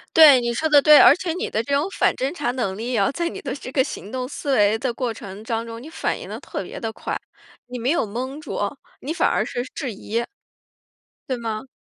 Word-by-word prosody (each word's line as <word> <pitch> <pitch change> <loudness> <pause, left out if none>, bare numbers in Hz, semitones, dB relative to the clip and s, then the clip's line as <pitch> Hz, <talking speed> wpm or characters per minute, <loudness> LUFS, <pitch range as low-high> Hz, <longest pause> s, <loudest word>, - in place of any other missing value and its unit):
对， 295 -6 +9
你 235 0 -1
说 315 +7 0
的 295 -2 +6
对。 300 +1 +8
而 - - +8
且 360 -2 -3
你 365 - -3
的 220 - 0
这 280 - -3
种 290 +5 +1
反 - - +4
侦 270 +4 -2
查 245 -8 -1
能 230 -7 -2
力 235 +2 -2
哦， 200 - +2
在 340 +2 -1
你 - - -7
的 270 - -4
这 255 - -8
个 265 -1 +3
行 210 - -7
动 255 -1 -3
思 280 0 -2
维 210 0 +4
的 245 0 -1
过 240 -1 -2
程 200 -1 -9
当 225 0 -2
中， 230 0 -8
你 295 - -10
反 - - -2
应 - - -9
得 - - -6
特 - - -5
别 - - -8
地 225 -2 -3
快， - - -4 0.5
你 250 0 -6
没 245 +3 0
有 340 - +1
懵 255 +7 -5
住， - - -5 0.4
你 295 - -3
反 345 - +2
而 - - +1
是 245 - -3
质 260 -7 -3
疑。 230 +4 -3 1.0
对 260 - 0
吗？ 225 +1 -4
250 Hz, 265 characters per minute, -22 LUFS, 225-285 Hz, 1.0 s, 对